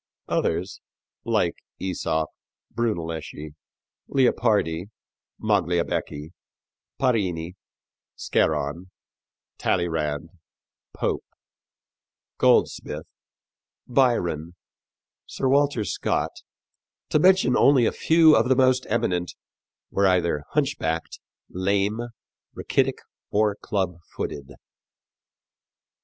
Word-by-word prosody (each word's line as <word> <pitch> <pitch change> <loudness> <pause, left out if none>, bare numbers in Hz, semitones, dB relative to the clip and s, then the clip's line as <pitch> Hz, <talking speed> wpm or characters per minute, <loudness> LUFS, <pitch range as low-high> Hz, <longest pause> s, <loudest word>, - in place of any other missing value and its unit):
Others, 90 +4 -1 0.4
like 105 -7 +1 0.2
Æsop, 80 -4 -1 0.5
Brunelleschi, 80 -9 -3 0.6
Leopardi, 105 -10 +2 0.5
Magliabecchi, 85 -6 -1 0.7
Parini, 90 -8 0 0.6
Scarron, 85 +6 0 0.7
Talleyrand, 80 -3 -1 0.6
Pope, - - -1 1.2
Goldsmith, - - +2 0.8
Byron, 90 - +1 0.7
Sir 135 - -2
Walter 140 -4 +2
Scott, - - -1 0.8
to 155 - +3
mention 190 +3 +5
only 135 -4 +5
a - - +2
few 160 -1 +5
of 125 - +2
the 130 - +5
most 130 0 +3
eminent, 90 -6 0 0.6
were 100 0 +3
either 85 -5 +1
hunchbacked, 135 - -1 0.3
lame, 100 +4 0 0.5
rachitic - - 0 0.3
or 105 -1 +2
clubfooted. 85 -8 -4
95 Hz, 70 wpm, -24 LUFS, 80-120 Hz, 1.2 s, mention